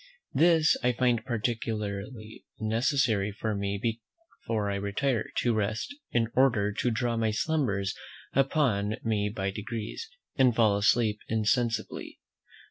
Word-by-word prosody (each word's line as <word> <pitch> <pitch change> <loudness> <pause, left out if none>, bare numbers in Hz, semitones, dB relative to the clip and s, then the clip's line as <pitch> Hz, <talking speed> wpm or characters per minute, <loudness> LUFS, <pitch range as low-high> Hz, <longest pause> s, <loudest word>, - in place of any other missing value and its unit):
This 160 +1 +5
I 125 0 +2
find 120 -2 +1
particularly 110 -2 -3 0.2
necessary 110 -2 +1
for 110 +2 -3
me 100 0 -2
before 115 - -4
I - - -1
retire, 105 +4 -1
to 120 - +2
rest, 110 - -1 0.2
in 115 -2 +1
order 115 -6 +3
to 120 - 0
draw 120 +1 0
my 110 -1 +1
slumbers 105 -6 0 0.4
upon 125 -7 +2
me 105 -2 0
by 100 -2 -2
degrees, 110 - -5 0.3
and 130 -3 +4
fall 110 -3 +4
asleep 105 +1 +2
insensibly. 115 +1 -1
110 Hz, 125 wpm, -28 LUFS, 105-125 Hz, 0.4 s, This